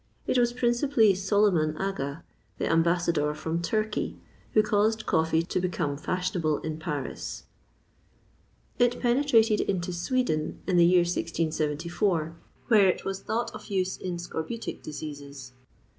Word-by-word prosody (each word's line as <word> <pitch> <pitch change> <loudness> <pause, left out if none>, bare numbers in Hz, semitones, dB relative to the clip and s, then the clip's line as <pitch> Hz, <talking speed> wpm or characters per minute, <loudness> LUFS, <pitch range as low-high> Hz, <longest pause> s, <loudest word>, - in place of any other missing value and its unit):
It 255 - +2
was 240 -1 +3
principally 240 -2 +3
Soliman 190 -5 +2
Aga, 165 -6 -3 0.3
the - - -1
ambassador 165 -2 +2
from 160 +2 -2
Turkey, 215 +4 -1 0.4
who 215 - +5
caused 220 +1 +1
coffee 160 0 +2
to 175 - -2
become 175 -5 -1
fashionable 170 -1 -1
in 155 0 -4
Paris. 150 -4 -5 1.4
It 245 0 +3
penetrated 240 -4 +3
into 180 -2 -2
Sweden 175 - -1
in 185 -2 +1
the 170 -1 +7
year 180 0 +5
1674, 165 +1 -1 0.3
where 210 -5 +6
it 185 - 0
was 195 0 -2
thought 230 +2 -2
of - - -10
use 190 -2 -1
in 180 -2 -4
scorbutic 175 +6 -5
diseases. 145 -4 -8
180 Hz, 130 wpm, -27 LUFS, 160-215 Hz, 1.4 s, the